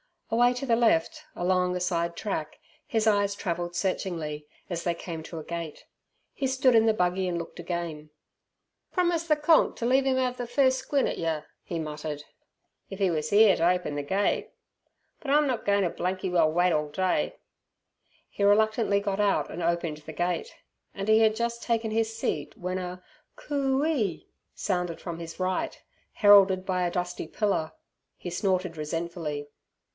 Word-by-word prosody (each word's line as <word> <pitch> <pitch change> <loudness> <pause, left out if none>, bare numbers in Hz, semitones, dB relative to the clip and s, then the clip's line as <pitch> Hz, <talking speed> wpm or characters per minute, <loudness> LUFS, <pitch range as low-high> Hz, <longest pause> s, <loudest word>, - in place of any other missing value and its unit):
Away 240 +2 +4
to 250 - -4
the 230 -3 +3
left 220 -9 +2
along 180 0 +1
a - - -1
side 170 -1 -1
track 160 -7 -4 0.3
his 220 -2 0
eyes 205 -2 +2
travelled 175 -3 -3
searchingly, 165 -6 -2 0.2
as 170 -2 -3
they 170 -1 0
came 165 -1 -6
to 165 - -8
a - - -7
gate. 170 -2 -6 0.5
He 270 - -1
stood 260 -1 +3
in 225 -1 +5
the 220 - +4
buggy 180 -1 0
and 175 -1 -1
looked 170 0 -7
again. 170 -3 -4 0.8
"Promised 345 -2 +1
ther 305 - +4
'Konk' 300 +2 +4
t' 230 - -4
leave 265 +2 +3
'im 260 -1 +2
'ave 250 -1 -1
furst 260 +2 +2
squint 280 -2 0
at - - -4
yer," 160 -2 -2 0.2
he 170 - -5
muttered, 150 -1 -5 0.7
"if 195 - -7
'e 190 -2 +3
was 155 -1 -2
'ere 210 -1 +6
t' - - -5
open 175 -3 +1
ther 145 - -1
gate! 195 +7 0 0.7
But 275 - -4
I'm 295 +1 +5
not 255 -5 -2
goin' 200 0 +3
t' 175 - +1
blanky 185 +2 -2
well 165 -3 +3
wait 175 +2 +3
orl 150 -2 0
day!" 185 +4 0 0.9
He 200 - -3
reluctantly 215 0 +3
got 200 -1 -2
out 205 -1 +1
and 175 - -5
opened 170 -2 -1
the 155 +1 -10
gate, 180 - -2 0.4
and 195 +1 -3
he 220 0 +6
had 220 -1 +4
just 235 +1 -2
taken 230 -2 0
his 225 0 0
seat 150 -9 -3
when 180 +1 -3
a 180 0 -6 0.3
"Coo 275 -1 0
ee" 220 - -1 0.3
sounded 180 -4 -2
from 170 -2 -6
his 165 +1 -8
right, 185 0 -1 0.3
heralded 195 -2 +6
by 180 -2 0
a - - -3
dusty 180 -2 -3
pillar. 195 -5 -1 0.4
He 180 - -6
snorted 185 -2 -1
resentfully. 155 -2 -4
185 Hz, 175 wpm, -27 LUFS, 170-225 Hz, 0.9 s, ere